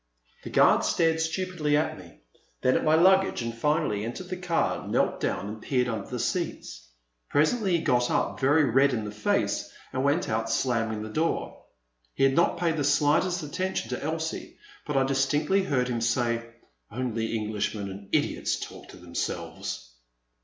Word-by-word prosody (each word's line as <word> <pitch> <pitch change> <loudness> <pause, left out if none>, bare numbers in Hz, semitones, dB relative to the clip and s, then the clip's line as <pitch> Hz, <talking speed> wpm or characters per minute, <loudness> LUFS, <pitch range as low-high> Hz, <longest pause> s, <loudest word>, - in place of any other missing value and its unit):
The - - -6
guard - - +5
stared 160 -1 +2
stupidly 160 -3 0
at 155 - 0
me, - - -15 0.4
then 130 - +4
at - - +1
my 155 0 +4
luggage, 190 -4 +4
and 115 0 -4
finally, 115 -6 0
entering 120 +11 -6
the 185 - -2
car, 180 -2 -1
knelt - - +1
down 100 - -2
and 105 +1 -7
peered 125 -2 +1
under 110 -5 -3
the - - -3
seats. - - -3 0.4
Presently 180 +5 +2
he 160 - -4
got 120 0 +2
up, - - 0
very 145 +4 +4
red 135 +1 +3
in 110 -2 -3
the 105 - -5
face, 105 0 0 0.2
and 130 - -1
went 145 +6 +2
out 110 +1 -1
slamming 115 -3 0
the 110 - -6
door. 160 +9 -2 0.5
He - - +1
had 135 0 +5
not 170 - +3
paid 165 -2 0
the 145 - 0
slightest 150 +5 +2
attention 185 +6 -3
to 125 - -4
Elsie, 160 +1 -4 0.3
but 150 -2 0
I 135 - +4
distinctly 135 +8 +2
heard 135 -9 0
him 120 -2 -2
say, 115 0 0 0.4
only 115 -2 -2
Englishmen 105 -1 -2
and 100 +1 -10
idiots - - 0
talk - - -9
to - - -12
themselves 85 -8 -5
135 Hz, 175 wpm, -27 LUFS, 115-160 Hz, 0.5 s, guard